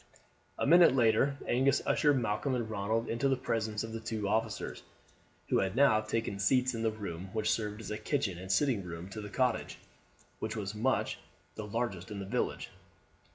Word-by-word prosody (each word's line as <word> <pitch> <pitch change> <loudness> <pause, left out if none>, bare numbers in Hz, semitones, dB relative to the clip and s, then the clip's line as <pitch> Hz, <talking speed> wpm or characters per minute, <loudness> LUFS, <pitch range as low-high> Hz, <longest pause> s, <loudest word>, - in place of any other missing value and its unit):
A - - 0
minute 170 -1 +7
later 125 +3 +3
Angus 135 +3 +3
ushered 145 -3 +3
Malcolm 115 +4 -1
and 120 -3 -2
Ronald 110 +2 -1
into 135 +4 0
the 135 - +3
presence 110 -4 -2
of 115 0 -6
the 115 - -3
two 110 -2 -3
officers, 110 0 -1 0.7
who - - +3
had 95 +1 -1
now 130 -5 +5
taken 110 -2 -2
seats 125 +5 +3
in 115 - -3
the 115 - +2
room 95 -4 -6
which 110 -1 +1
served 105 -1 -2
as 110 - -7
kitchen 110 - -1
and 95 +1 -5
sitting 115 -1 +2
room 85 +1 -7
to 110 +2 -6
the 105 - -7
cottage, 125 0 0 0.6
which 110 0 -3
was 105 -2 -3
much 120 +5 0 0.3
the 110 - -6
largest 105 -4 -3
in 105 - -6
the 100 - -5
village. 120 +6 -2
110 Hz, 185 wpm, -32 LUFS, 105-125 Hz, 0.7 s, minute